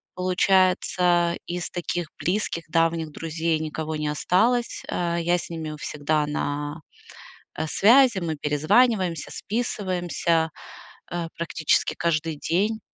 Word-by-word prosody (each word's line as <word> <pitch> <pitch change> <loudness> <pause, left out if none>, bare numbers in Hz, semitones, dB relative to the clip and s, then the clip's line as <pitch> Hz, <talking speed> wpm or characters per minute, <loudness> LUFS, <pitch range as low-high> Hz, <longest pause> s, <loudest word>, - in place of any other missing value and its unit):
Получается, 180 -2 +2
из 175 0 -4
таких 175 -2 -3
близких, 180 -2 -1
давних 165 -1 +1
друзей 160 +1 -1
никого 155 0 -4
не 150 0 -2
осталось. 220 +11 +1
Э, 170 -1 -1
я 175 +1 +2
с - - -7
ними 160 -2 -5
у 155 - -7
всегда 150 +1 -1
на, 145 +1 -3 0.7
э, 160 - -3
связи. 235 - +5
Мы 165 -3 -2
перезваниваемся, 165 - +2
списываемся, 180 -7 -1 0.6
э, 175 -1 -2
практически 165 -2 0
каждый 160 -1 0
день. 200 +9 0
170 Hz, 115 wpm, -24 LUFS, 155-185 Hz, 0.7 s, связи